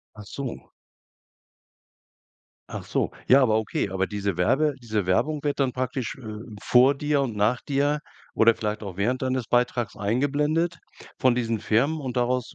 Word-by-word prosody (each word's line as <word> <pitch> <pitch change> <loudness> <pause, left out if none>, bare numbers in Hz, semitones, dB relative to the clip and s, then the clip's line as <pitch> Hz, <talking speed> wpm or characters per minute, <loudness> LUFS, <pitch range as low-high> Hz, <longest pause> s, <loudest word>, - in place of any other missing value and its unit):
Ach 105 - -10
so. 130 +2 -7 2.0
Ach - - -5
so. - - -1 0.2
Ja, 135 +2 +6
aber 110 -3 +3
okay, 105 -3 -2
aber 95 0 0
diese 100 -3 -3
Werbe 140 +11 +2
diese 110 -4 -2
Werbung 145 +11 +1
wird 145 -1 -1
dann 135 -2 +1
praktisch, 125 -1 -3
äh, 110 -5 -8 0.2
vor 130 +3 +5
dir 145 0 0
und 120 -5 -2
nach 105 +4 +1
dir 145 +1 +1 0.3
oder 115 0 +5
vielleicht 105 -1 -3
auch 95 -2 -7
während 125 +7 0
deines 130 -2 -1
Beitrags 120 -2 0
eingeblendet 145 - 0 0.4
von 130 -2 +3
diesen 115 -2 -1
Firmen, 135 +10 +1
und 130 -3 -5
daraus 125 0 0
125 Hz, 160 wpm, -25 LUFS, 110-140 Hz, 2.0 s, Ja